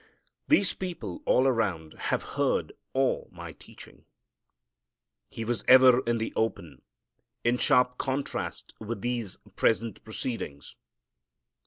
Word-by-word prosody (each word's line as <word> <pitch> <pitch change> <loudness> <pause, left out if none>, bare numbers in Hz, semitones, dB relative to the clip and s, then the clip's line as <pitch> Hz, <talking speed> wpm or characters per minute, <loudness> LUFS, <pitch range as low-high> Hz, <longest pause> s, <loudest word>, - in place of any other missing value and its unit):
These 205 -11 +4
people 185 - -6
all 130 - +4
around 100 -11 0 0.2
have - - 0
heard - - 0 0.2
all 135 -1 0
my - - -9
teaching." - - -15 1.2
He 115 - -6
was 115 -3 -2
ever 130 -1 +8
in 120 0 +1
the 110 - -3
open, 100 -7 -2 0.6
in 120 +1 +2
sharp 125 0 +3
contrast 135 0 -3
with 110 -1 -5
these 120 -5 -3 0.2
present 115 0 0
proceedings. 110 - -6
120 Hz, 115 wpm, -28 LUFS, 110-130 Hz, 1.2 s, ever